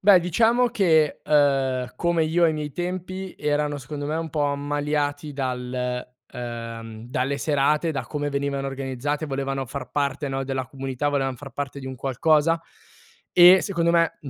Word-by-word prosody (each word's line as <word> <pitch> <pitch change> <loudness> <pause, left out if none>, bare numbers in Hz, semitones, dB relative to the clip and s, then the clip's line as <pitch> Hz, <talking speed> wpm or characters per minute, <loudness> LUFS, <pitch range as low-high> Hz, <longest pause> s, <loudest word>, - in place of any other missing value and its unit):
Beh 195 -1 +7
diciamo 230 +8 +3
che, 160 -9 +2
ehm, 135 -4 +2
come 170 -2 +1
io 170 +2 +2
ai 165 - +4
miei 150 -1 -4
tempi, 185 +3 -4
erano 150 0 0
secondo 145 +2 -6
me 155 - -1
un 165 -1 -3
po' 150 -1 0
ammaliati 145 +1 -1
dal, 125 -2 -3 0.2
ehm, 115 -2 -7
dalle 140 +1 -1
serate, 150 +3 +2
da 140 - -3
come 145 -1 -2
venivano 140 -1 -1
organizzate, 135 +3 -3
volevano 135 -1 -2
far 130 -1 -6
parte, 140 +1 -1
no, 135 0 -2
della 130 -1 -3
comunità, 135 +2 -3
volevan 135 -2 0
far 135 +3 -10
parte 140 -1 -4
di 130 - -8
un 130 - -5
qualcosa. 150 +5 +2 0.7
E 180 +2 +9
secondo 170 -4 +1
me 165 -1 +2
m 145 - -7
145 Hz, 165 wpm, -24 LUFS, 135-160 Hz, 0.7 s, E